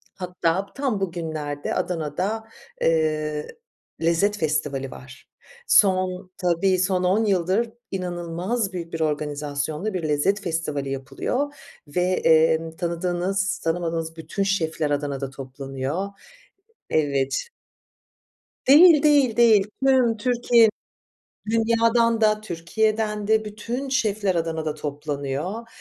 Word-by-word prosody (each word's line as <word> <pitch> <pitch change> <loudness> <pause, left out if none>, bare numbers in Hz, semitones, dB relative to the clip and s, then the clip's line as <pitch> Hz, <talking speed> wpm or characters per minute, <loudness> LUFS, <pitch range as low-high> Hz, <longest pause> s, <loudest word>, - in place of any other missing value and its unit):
Hatta 180 0 -1
tam 270 -7 -1
bugünlerde 155 -5 -3
Adana'da, 180 +6 -2 0.4
eee, 155 -2 0 0.5
lezzet 170 +6 +2
festivali 145 -5 -1
var. 130 +1 -13 0.4
Son, 185 - +3
tabii 180 +1 +1
son 185 0 +1
on 200 +5 +2
yıldır 195 +4 +1 0.2
inanılmaz 180 +4 -3
büyük 170 -2 -6
bir 165 - -3
organizasyonla 150 +4 -2
bir 180 -3 -3
lezzet 190 +8 +1
festivali 160 -6 -2
yapılıyor 250 - -3 0.3
ve, 160 +5 -1
emm, 160 -2 +3
tanıdığınız 180 +3 -1
tanımadığınız 165 -1 -2
bütün 160 +5 -3
şefler 160 -6 0
Adana'da 140 -2 -2
toplanıyor. 135 +5 -5 0.8
Evet. 140 - 0 1.2
Değil, 305 +2 +8
değil, 285 -6 +4
değil. 220 -4 +5 0.2
Tüm 255 -4 +4
Türkiye 240 -1 +4 0.8
dünyadan 230 0 +2
da 215 -1 +3
Türkiye'den 210 +3 -1
de 220 0 +3
bütün 230 +6 -5
şefler 210 -7 0
Adana'da 160 -2 -1
toplanıyor, 150 +7 -4
180 Hz, 100 wpm, -24 LUFS, 155-215 Hz, 1.2 s, Değil